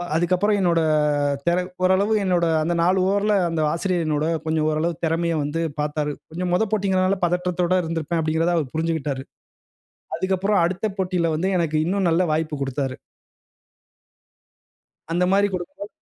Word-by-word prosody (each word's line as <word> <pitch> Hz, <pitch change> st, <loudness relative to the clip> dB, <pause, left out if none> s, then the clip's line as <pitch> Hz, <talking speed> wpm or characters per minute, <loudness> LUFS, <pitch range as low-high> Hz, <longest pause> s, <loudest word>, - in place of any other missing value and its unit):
அதுக்கப்புறம் 185 Hz, +5 st, +2 dB
என்னோட 175 Hz, -3 st, +2 dB, 0.7 s
தெர 170 Hz, +1 st, +3 dB, 0.3 s
ஓரளவு 190 Hz, +4 st, +3 dB
என்னோட 180 Hz, -3 st, +2 dB, 0.2 s
அந்த 170 Hz, +2 st, 0 dB
4 185 Hz, +3 st, +3 dB
ஓவர் 200 Hz, +1 st, +1 dB
ல -, -, +4 dB, 0.2 s
அந்த 165 Hz, -1 st, -1 dB
ஆசிரியர் 175 Hz, 0 st, -1 dB
என்னோட 150 Hz, -1 st, 0 dB, 0.2 s
கொஞ்சம் 160 Hz, -1 st, 0 dB
ஓரளவு 155 Hz, +2 st, 0 dB
திறமைய 165 Hz, +1 st, 0 dB
வந்து 150 Hz, +3 st, -3 dB, 0.2 s
பார்த்தாரு. 150 Hz, 0 st, -1 dB, 0.2 s
கொஞ்சம் 180 Hz, +2 st, -3 dB
மொத 180 Hz, -, +3 dB
போட்டிங்கிறனால, 190 Hz, -2 st, +1 dB
பதற்றத்தோட 180 Hz, 0 st, 0 dB
இருந்திருப்பேன். 165 Hz, 0 st, -2 dB
அப்பிடிங்கிறத 160 Hz, +2 st, +1 dB
அவரு 145 Hz, -6 st, -3 dB
புரிஞ்சிக்கிட்டாரு. 155 Hz, -4 st, -2 dB, 0.9 s
அதுக்கப்புறம் 190 Hz, +1 st, +1 dB
அடுத்த 185 Hz, +4 st, -2 dB
போட்டில 180 Hz, -3 st, 0 dB
வந்து 170 Hz, +5 st, -1 dB
எனக்கு 160 Hz, -3 st, 0 dB
இன்னும் 190 Hz, +1 st, 0 dB
நல்ல 165 Hz, +2 st, +2 dB
வாய்ப்பு 155 Hz, 0 st, -1 dB
கொடுத்தாரு. 135 Hz, -1 st, -2 dB, 2.2 s
அந்தமாரி 185 Hz, +4 st, +3 dB
கொடுக்கும்போது 185 Hz, +3 st, -6 dB
170 Hz, 135 wpm, -22 LUFS, 160-185 Hz, 2.2 s, ல